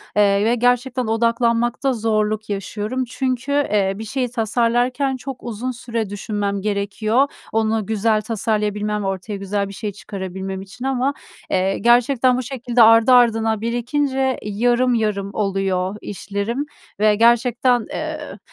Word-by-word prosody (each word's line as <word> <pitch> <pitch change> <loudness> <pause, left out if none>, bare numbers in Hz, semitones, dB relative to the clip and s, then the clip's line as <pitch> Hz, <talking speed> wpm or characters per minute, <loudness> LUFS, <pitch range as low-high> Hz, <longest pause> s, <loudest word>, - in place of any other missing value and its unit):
eee, 200 0 +3
ve 235 +2 +3
gerçekten 245 0 +1
odaklanmakta 235 +3 +1
zorluk 215 -1 -1
yaşıyorum. 210 +5 -3
Çünkü, 255 +2 -2
eee, 210 -9 +1
bir 215 - -6
şeyi 250 +3 -2
tasarlarken 245 +3 +1
çok 260 0 -8
uzun 240 +2 -4
süre 230 -3 -4
düşünmem 205 -1 -3
gerekiyor, 215 +5 +1 0.2
onu 220 -1 0
güzel 215 +1 +1
tasarlayabilmem, 210 -2 -1
ortaya 195 +2 -3
güzel 200 +1 -2
bir - - -9
şey 210 +1 -4
çıkarabilmem 190 -1 -6
için 195 +7 -9
ama, 270 +1 0 0.4
eee, 190 +1 +1
gerçekten 245 +1 +3
bu 255 - -2
şekilde 245 -1 0
ardı 225 +2 +6
ardına 225 -3 +4
birikince 260 +3 0
yarım 240 +4 +1
yarım 210 -4 -1
oluyor 195 -2 -1
işlerim 205 +7 -3 0.3
ve 210 0 +4
gerçekten, 240 +1 +3
eee, 310 -7 -5
225 Hz, 130 wpm, -20 LUFS, 205-245 Hz, 0.4 s, ardı